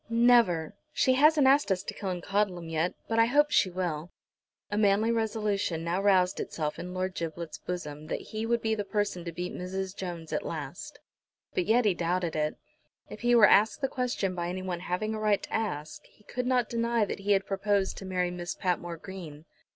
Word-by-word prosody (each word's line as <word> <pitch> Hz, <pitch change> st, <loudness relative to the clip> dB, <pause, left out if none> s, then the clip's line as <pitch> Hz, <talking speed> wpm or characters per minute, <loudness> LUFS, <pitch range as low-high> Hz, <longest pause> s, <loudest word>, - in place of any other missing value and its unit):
"Never. 230 Hz, -8 st, +4 dB, 0.2 s
She 260 Hz, -, +3 dB
hasn't 295 Hz, +2 st, +5 dB
asked 275 Hz, -4 st, +4 dB
us 185 Hz, -1 st, 0 dB
to -, -, -5 dB
Killancodlem 190 Hz, -2 st, -2 dB
yet, 165 Hz, +2 st, 0 dB
but 225 Hz, 0 st, +1 dB
I 230 Hz, -, +7 dB
hope 295 Hz, +4 st, +3 dB
she 190 Hz, -, +4 dB
will." 175 Hz, -3 st, -3 dB, 0.6 s
A -, -, 0 dB
manly 210 Hz, +2 st, +3 dB
resolution 210 Hz, -7 st, -1 dB
now 170 Hz, +3 st, 0 dB
roused 190 Hz, -2 st, +3 dB
itself 150 Hz, -2 st, -3 dB
in 180 Hz, +1 st, -6 dB
Lord 185 Hz, 0 st, -1 dB
Giblet's 165 Hz, -1 st, -5 dB
bosom 155 Hz, -4 st, -6 dB
that -, -, -2 dB
he 220 Hz, +1 st, -2 dB
would 235 Hz, 0 st, +1 dB
be 220 Hz, 0 st, +1 dB
the 210 Hz, -2 st, -1 dB
person 205 Hz, -4 st, -2 dB
to 170 Hz, -, -4 dB
beat 180 Hz, +2 st, -5 dB
Mrs. 190 Hz, +1 st, -4 dB
Jones 170 Hz, -4 st, -6 dB
at -, -, -1 dB
last. -, -, -6 dB, 0.6 s
But 180 Hz, -, 0 dB
yet 230 Hz, +2 st, +4 dB
he 205 Hz, -, +4 dB
doubted. 170 Hz, -3 st, -1 dB, 0.6 s
If -, -, -8 dB
he 240 Hz, 0 st, +4 dB
were 225 Hz, -3 st, +8 dB
asked 215 Hz, +6 st, +4 dB
the 270 Hz, -, +2 dB
question 250 Hz, -8 st, -1 dB
by 175 Hz, -1 st, -3 dB
anyone 185 Hz, -1 st, -3 dB
having 180 Hz, +5 st, -2 dB
a 215 Hz, -, -3 dB
right 210 Hz, -2 st, +2 dB
to -, -, -8 dB
ask 155 Hz, -9 st, -3 dB
he 210 Hz, -, -26 dB
could 250 Hz, +3 st, -4 dB
not 250 Hz, -2 st, +2 dB
deny 235 Hz, -1 st, +1 dB
that -, -, -5 dB
he 205 Hz, +1 st, +2 dB
had 195 Hz, 0 st, +1 dB
proposed 195 Hz, 0 st, 0 dB
to 195 Hz, -, -8 dB
marry 180 Hz, -1 st, -1 dB
Miss 175 Hz, 0 st, -5 dB
Patmore 175 Hz, -2 st, -2 dB
Green. 165 Hz, -5 st, -9 dB
190 Hz, 195 wpm, -29 LUFS, 175-220 Hz, 0.6 s, were